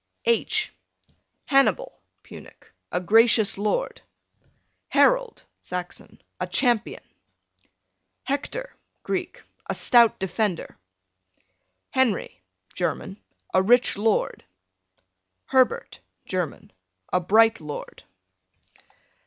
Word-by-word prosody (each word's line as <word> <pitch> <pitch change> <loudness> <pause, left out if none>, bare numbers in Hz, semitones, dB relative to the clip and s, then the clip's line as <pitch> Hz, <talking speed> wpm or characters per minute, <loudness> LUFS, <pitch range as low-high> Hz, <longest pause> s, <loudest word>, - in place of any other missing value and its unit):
H 470 - +1 0.7
Hannibal, 275 -1 +1 0.2
Punic, - - -14 0.2
a 180 - 0
gracious 220 +3 +4
lord. 215 - -2 0.9
Harold, - - +2
Saxon, 180 0 -7 0.2
a - - -2
champion. 240 -4 0 1.2
Hector, 295 - -4 0.3
Greek, - - -4 0.3
a - - -1
stout 235 -3 +5
defender. 190 -1 -2 1.2
Henry, 240 - 0 0.3
German, 190 +2 -4 0.3
a 185 - +4
rich 245 +6 +3
lord. 215 +1 0 1.0
Herbert, 270 - +1 0.3
German, 180 -5 -4 0.4
a 180 - +4
bright 220 +3 +3
lord. 150 -1 -8
225 Hz, 80 wpm, -24 LUFS, 185-260 Hz, 1.2 s, stout